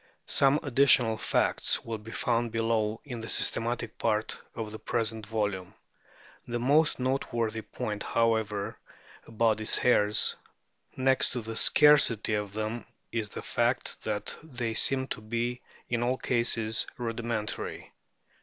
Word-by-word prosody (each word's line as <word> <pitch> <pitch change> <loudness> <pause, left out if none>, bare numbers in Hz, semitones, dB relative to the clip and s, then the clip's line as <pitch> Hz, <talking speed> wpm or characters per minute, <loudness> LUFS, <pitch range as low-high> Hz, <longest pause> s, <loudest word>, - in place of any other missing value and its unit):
Some 140 +2 +3
ad 145 -5 -6
ditional 125 -5 +5
facts - - +1
will 115 -1 -4
be 110 +2 -12
found 115 0 -1
below 115 -1 0
in 120 -5 -6
the 110 - -7
systematic 115 0 -1
part 110 -1 0 0.2
of 110 -2 -5
the 110 - -8
present 110 -1 -2
volume. 105 -4 -2 0.7
The 120 0 -2
most 145 +6 +3
noteworthy 120 -4 -1
point, 105 -1 -5
however, 110 -3 0 0.5
about 110 -1 +1
these 110 - +2
hairs, 105 -4 +3 0.6
next 130 0 +2
to 125 - -3
the 115 0 -6
scarcity 130 -6 +5
of 105 -2 -2
them, 110 +2 -4 0.2
is 110 -3 -2
the - - -7
fact 120 +1 -1
that 105 -1 -2
they 125 -7 -4
seem 130 +3 +1
to - - -5
be 120 +3 -3 0.3
in 120 -1 -1
all 125 +2 +1
cases 115 -3 +1
rudimentary. 115 -2 -4
115 Hz, 135 wpm, -28 LUFS, 110-120 Hz, 0.7 s, ditional